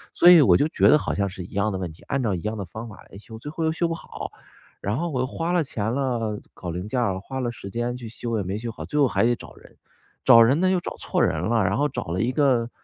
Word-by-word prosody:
所 175 - +7
以 170 - +9
我 - - +6
就 145 - +2
觉 - - +3
得 150 - +7
好 - - -2
像 100 -1 0
是 90 -1 -7
一 - - -12
样 100 +1 0
的 95 - -3
问 90 -3 -4
题， - - -19
按 135 -2 -1
照 105 -4 0
一 85 - -3
样 110 +1 -3
的 100 - -3
方 110 +7 -8
法 105 - -11 0.2
来 100 - -11
修， 110 +1 -11
最 145 +6 -8
后 165 +1 -4
又 160 - +2
修 170 +1 0
不 - - -1
好。 - - -7 0.5
然 105 +5 -1
后 170 +1 -2
我 130 - -2
又 130 - 0
花 165 +5 -3
了 175 -3 +2
钱 110 -2 -2
了， 120 -6 -1 0.2
搞 90 - -7
零 90 +4 -5
件 125 +3 -1
了， 95 -5 0
花 130 +7 -6
了 120 -1 -1
时 100 -4 -9
间 120 +3 -2
去 120 -2 -8
修 115 -1 -4
也 100 - -1
没 95 +3 -3
修 115 +1 -5
好， - - -8
最 150 - -4
后 140 - +6
还 - - +1
得 120 +1 +3
找 - - -12
人。 - - -18 0.5
找 115 - +8
人 130 +7 +4
呢 185 0 +3
又 185 -1 +2
找 - - -6
错 - - -2
人 80 - +1
了， 110 +2 +1
然 95 +3 +1
后 145 +1 +1
找 - - -4
了 85 +4 -2
一 120 +2 +1
个， 125 -4 +2
115 Hz, 330 characters per minute, -24 LUFS, 100-140 Hz, 0.5 s, 以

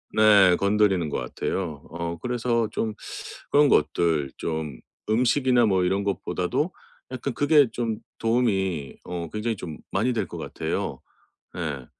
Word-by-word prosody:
네 100 -4 +7
건드리는 100 -5 +2
것 - - -2
같아요 80 -7 -3
어 85 0 -4
그래서 120 -2 0
좀 110 -1 -2 0.6
그런 145 -1 +5
것들 75 -2 +2
좀 80 -5 -3 0.3
음식이나 125 +1 +3
뭐 95 -3 +2
이런 95 +2 +1
것보다도 100 - -1 0.4
약간 130 +1 -3
그게 145 -1 +4
좀 115 -3 -2 0.2
도움이 95 - 0
어 85 -2 -5
굉장히 110 +1 -1
좀 80 -4 -7
많이 120 +6 +1
될 105 -5 -1
것 - - -8
같아요. - - -3 0.6
예. 75 -7 -4
100 Hz, 255 characters per minute, -25 LUFS, 85-120 Hz, 0.6 s, 네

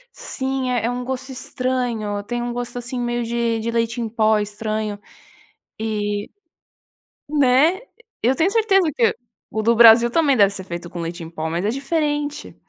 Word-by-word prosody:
Sim, 265 -1 -3
é 240 -3 0
é - - +1
um 245 0 -3
gosto 260 +1 -4
estranho, 245 -5 -2
tem 240 +3 -3
um 240 0 -3
gosto, 245 0 -5
assim, 245 +1 -4
meio 240 0 -1
de 235 -1 -1
de 230 +1 -2
leite 230 +1 -1
em 230 - -3
pó 220 -1 +3
estranho 210 0 -3 0.8
e 205 -2 -2 1.0
né, 290 +5 +4 0.4
eu 250 +4 +2
tenho 335 +7 +2
certeza 390 -6 +3
que 230 - +2 0.3
o 220 - -2
do 230 +2 +3
Brasil 235 +1 +8
também 285 +1 +3
deve 200 -2 +6
ser 190 - -6
feito 175 -1 -7
com 175 - -7
leite 170 +1 -5
em 165 - -8
pó 160 -1 -4
mas 170 +4 -2
é - - +2
diferente. 295 +2 -2
235 Hz, 175 wpm, -21 LUFS, 215-260 Hz, 1.0 s, Brasil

